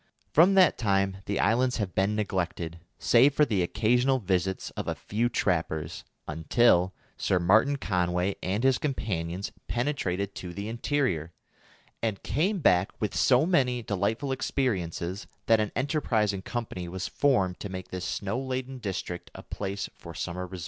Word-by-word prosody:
From 180 Hz, +5 st, +6 dB
that 185 Hz, -2 st, +5 dB
time 100 Hz, -3 st, +1 dB
the 100 Hz, -, -1 dB
islands 125 Hz, +4 st, +2 dB
have 100 Hz, -5 st, -2 dB
been 100 Hz, +2 st, +1 dB
neglected, 90 Hz, -5 st, -2 dB, 0.2 s
save 130 Hz, +4 st, +4 dB
for 150 Hz, -, +5 dB
the 105 Hz, -8 st, 0 dB
occasional 120 Hz, +8 st, +2 dB
visits 95 Hz, -3 st, -1 dB
of -, -, -5 dB
a -, -, -1 dB
few 115 Hz, +4 st, -1 dB
trappers, 80 Hz, -7 st, -1 dB, 0.2 s
until 90 Hz, +4 st, +3 dB, 0.2 s
Sir 95 Hz, -, +1 dB
Martin 110 Hz, +11 st, +4 dB
Conway 90 Hz, -4 st, 0 dB
and 100 Hz, +6 st, -1 dB
his 130 Hz, -2 st, +4 dB
companions 95 Hz, -, -2 dB, 0.2 s
penetrated 100 Hz, -7 st, -1 dB
to 90 Hz, -3 st, -7 dB
the 100 Hz, +2 st, -4 dB
interior, 115 Hz, -, -1 dB, 0.7 s
and 110 Hz, -4 st, -2 dB
came 180 Hz, -, 0 dB
back 90 Hz, -6 st, +3 dB
with 105 Hz, -4 st, -2 dB
so 125 Hz, -, +4 dB
many 125 Hz, -9 st, +2 dB
delightful 110 Hz, +7 st, -1 dB
experiences 100 Hz, -, -2 dB, 0.2 s
that 115 Hz, -1 st, +5 dB
an 105 Hz, -1 st, 0 dB
enterprising 115 Hz, -8 st, 0 dB
company 110 Hz, -6 st, -4 dB
was 95 Hz, +1 st, -4 dB
formed 100 Hz, -11 st, +1 dB
to 100 Hz, -, -5 dB
make 95 Hz, -1 st, -6 dB
this 90 Hz, -1 st, -5 dB
snow 100 Hz, +6 st, -2 dB
laden 130 Hz, 0 st, -4 dB
district 95 Hz, -4 st, -4 dB
a -, -, -9 dB
place 100 Hz, 0 st, -4 dB
for 85 Hz, -2 st, -11 dB
summer 90 Hz, +1 st, -4 dB
resort. 95 Hz, 0 st, -8 dB
100 Hz, 155 wpm, -28 LUFS, 90-125 Hz, 0.7 s, From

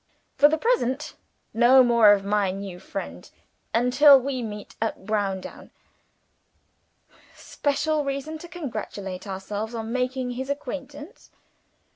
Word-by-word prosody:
For 290 Hz, -, +6 dB
the 315 Hz, -, +1 dB
present, 300 Hz, -, 0 dB, 0.4 s
no 245 Hz, +3 st, +6 dB
more 235 Hz, -3 st, +6 dB
of 200 Hz, -1 st, +2 dB
my 205 Hz, -1 st, +1 dB
new 190 Hz, -1 st, -6 dB
friend 85 Hz, -, -7 dB, 0.4 s
until 265 Hz, +4 st, +6 dB
we 260 Hz, 0 st, -3 dB
meet 210 Hz, -2 st, -7 dB
at 225 Hz, -3 st, -3 dB
Browndown.' 200 Hz, -3 st, -3 dB, 1.7 s
'Special 295 Hz, +1 st, -1 dB
reason 280 Hz, +3 st, -4 dB
to 345 Hz, -, -10 dB
congratulate 215 Hz, -, -6 dB
ourselves 205 Hz, +4 st, -5 dB
on 225 Hz, 0 st, -4 dB
making 255 Hz, 0 st, -2 dB
his 260 Hz, +2 st, -5 dB
acquaintance.'" 290 Hz, -, -7 dB
245 Hz, 115 wpm, -25 LUFS, 210-285 Hz, 1.7 s, For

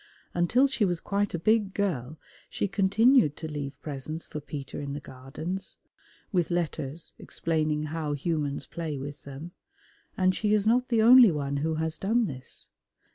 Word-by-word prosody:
Until 175 Hz, +10 st, +3 dB
she 265 Hz, -5 st, +1 dB
was 175 Hz, -4 st, +1 dB
quite 200 Hz, 0 st, -1 dB
a -, -, 0 dB
big 205 Hz, +2 st, +2 dB
girl 155 Hz, -8 st, -1 dB, 0.3 s
she -, -, -1 dB
continued 200 Hz, -, +4 dB
to 160 Hz, -, -5 dB
leave 145 Hz, -2 st, -5 dB
presents 155 Hz, +2 st, -5 dB
for 150 Hz, -, -6 dB
Peter 140 Hz, -1 st, -6 dB
in 140 Hz, -1 st, -4 dB
the 145 Hz, -, -4 dB
Gardens 150 Hz, +9 st, -5 dB, 0.5 s
(with 175 Hz, -5 st, +1 dB
letters 165 Hz, -3 st, -2 dB
explaining 155 Hz, -2 st, -1 dB
how 155 Hz, -3 st, -2 dB
humans 145 Hz, -1 st, -2 dB
play 160 Hz, -4 st, -4 dB
with 140 Hz, +2 st, -7 dB
them), 140 Hz, +5 st, -8 dB, 0.7 s
and 185 Hz, 0 st, +3 dB
she 210 Hz, +2 st, +2 dB
is 210 Hz, -1 st, +1 dB
not 245 Hz, +3 st, +3 dB
the 225 Hz, -3 st, +3 dB
only 245 Hz, 0 st, +9 dB
one 140 Hz, -3 st, -2 dB
who 160 Hz, +3 st, 0 dB
has 160 Hz, 0 st, -1 dB
done 225 Hz, +4 st, +2 dB
this. 130 Hz, -7 st, -6 dB
165 Hz, 165 wpm, -28 LUFS, 145-200 Hz, 0.7 s, only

